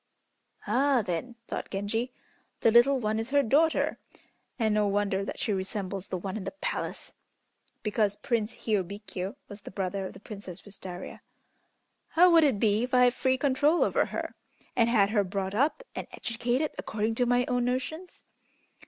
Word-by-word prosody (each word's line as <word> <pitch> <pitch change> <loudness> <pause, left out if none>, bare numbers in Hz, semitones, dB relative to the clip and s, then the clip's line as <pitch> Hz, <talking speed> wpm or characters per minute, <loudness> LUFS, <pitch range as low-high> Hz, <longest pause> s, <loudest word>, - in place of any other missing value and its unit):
'" - - -48 0.2
"Ah, 255 +2 +3
then," 190 +7 -3
thought - - -4
Genji, 225 +5 -2 0.5
"the 225 - +5
little 260 +4 +6
one 215 -1 0
is 225 +2 -3
her 285 +1 +4
daughter, 310 +7 +2 0.6
and 220 -3 +2
no 210 -1 +3
wonder 200 -1 +1
that - - -5
she 210 - 0
resembles 195 0 -3
the 185 - -3
one 190 +2 -5
in 215 - -4
the - - -4
palace - - -4 0.7
(because 210 -1 +1
Prince 230 0 -1
Hiôbkiô 200 -2 -2
was 205 0 -10
the - - -9
brother 190 0 -3
of - - -10
the - - -12
Princess 200 -4 -8
Wistaria). 190 -3 -8 0.9
How 355 +2 +5
would 330 -1 +7
it 265 -9 +3
be 210 0 +3
if 250 +1 0
I 250 - +6
had 245 -1 +5
free 260 0 +1
control 285 +4 +3
over - - +2
her, - - -4 0.4
and 230 -1 +4
had 210 -4 +4
her 210 -3 +3
brought 190 0 -3
up 285 - +1
and - - -5
educated 245 +5 -1
according 220 +1 -1
to 245 +2 +1
my 245 +1 +3
own 245 -1 +1
notions?" 315 +8 -3
220 Hz, 175 wpm, -28 LUFS, 200-255 Hz, 0.9 s, would